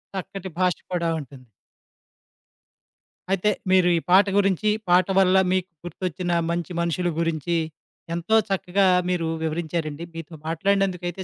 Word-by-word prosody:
చక్కటి 190 Hz, 0 st, -6 dB
భాష 180 Hz, -1 st, +2 dB, 0.2 s
కూడా 170 Hz, -2 st, 0 dB
ఉంటుంది. 130 Hz, -3 st, -12 dB, 1.8 s
అయితే 195 Hz, +2 st, +2 dB, 0.2 s
మీరు 185 Hz, -1 st, +5 dB
ఈ -, -, +1 dB
పాట 190 Hz, +2 st, +7 dB
గురించి, 200 Hz, +1 st, +2 dB, 0.2 s
పాట 180 Hz, +1 st, +5 dB
వల్ల 190 Hz, 0 st, +4 dB, 0.2 s
మీకు 185 Hz, -1 st, -1 dB, 0.2 s
గుర్తొచ్చిన 180 Hz, 0 st, -4 dB, 0.2 s
మంచి 170 Hz, 0 st, -3 dB
మనుషుల 170 Hz, +1 st, 0 dB
గురించి, 165 Hz, 0 st, 0 dB, 0.6 s
ఎంతో 170 Hz, +6 st, 0 dB
చక్కగా 195 Hz, 0 st, +1 dB, 0.2 s
మీరు 175 Hz, -2 st, 0 dB, 0.2 s
వివరించారండి. 160 Hz, -1 st, -3 dB
మీతో 165 Hz, 0 st, -8 dB
మాట్లాడినందుకు 190 Hz, +2 st, 0 dB
అయితే 185 Hz, +2 st, -6 dB
180 Hz, 125 wpm, -24 LUFS, 165-190 Hz, 1.8 s, పాట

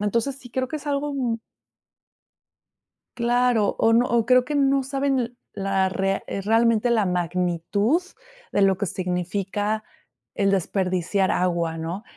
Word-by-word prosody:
entonces 235 Hz, +6 st, 0 dB
sí, 245 Hz, -, -13 dB
creo 260 Hz, +1 st, -2 dB
que 310 Hz, -, -3 dB
es 295 Hz, 0 st, -10 dB
algo, 285 Hz, 0 st, -1 dB
mm 245 Hz, -4 st, -1 dB, 1.8 s
Claro 240 Hz, -2 st, +2 dB
o 225 Hz, -, +4 dB
no, 240 Hz, +2 st, +4 dB
o 235 Hz, -2 st, +1 dB
creo 250 Hz, 0 st, +4 dB
que 295 Hz, -, -3 dB
no 275 Hz, -1 st, +3 dB
saben 265 Hz, -3 st, -1 dB, 0.2 s
la 195 Hz, -1 st, 0 dB
rea 195 Hz, +1 st, -1 dB
eh, 195 Hz, -, -3 dB
realmente 225 Hz, +2 st, +3 dB
la 220 Hz, -4 st, +2 dB
magnitud 180 Hz, -, 0 dB, 0.5 s
de 200 Hz, -, +1 dB
lo 195 Hz, -1 st, +4 dB
que 205 Hz, -, -1 dB
significa 195 Hz, +4 st, -2 dB, 0.5 s
el 195 Hz, -1 st, +2 dB
desperdiciar 185 Hz, 0 st, 0 dB
agua, 170 Hz, -2 st, 0 dB
¿no?, 170 Hz, +6 st, -5 dB
210 Hz, 145 wpm, -24 LUFS, 190-250 Hz, 1.8 s, o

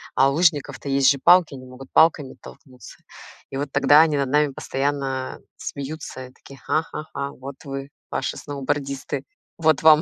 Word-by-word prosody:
а 135 Hz, +1 st, +5 dB
у 140 Hz, -, -1 dB
лыжников-то 150 Hz, -4 st, +1 dB
есть 135 Hz, -1 st, +4 dB
же 140 Hz, -, +3 dB
палки, 175 Hz, -4 st, +6 dB
они 130 Hz, -1 st, -9 dB
могут 130 Hz, +1 st, -12 dB
палками 155 Hz, -4 st, +4 dB
оттолкнуться, 130 Hz, -3 st, -14 dB, 0.5 s
и -, -, -6 dB
вот 140 Hz, 0 st, -3 dB
тогда 150 Hz, +1 st, +6 dB
они 155 Hz, -3 st, +2 dB
над 140 Hz, -1 st, 0 dB
нами 150 Hz, +1 st, +2 dB
постоянно 135 Hz, -1 st, -3 dB, 0.2 s
смеются, 140 Hz, -2 st, -7 dB
и 130 Hz, -, -19 dB
такие: 135 Hz, -2 st, -15 dB
"Ха-ха-ха, 155 Hz, -3 st, -3 dB
вот 135 Hz, +1 st, -9 dB
вы, 135 Hz, -1 st, -6 dB, 0.2 s
ваши 135 Hz, -, -2 dB
сноубордисты, 140 Hz, -1 st, -4 dB, 0.3 s
вот 160 Hz, -4 st, +2 dB
вам". 155 Hz, -1 st, +7 dB
140 Hz, 160 wpm, -23 LUFS, 135-150 Hz, 0.5 s, вам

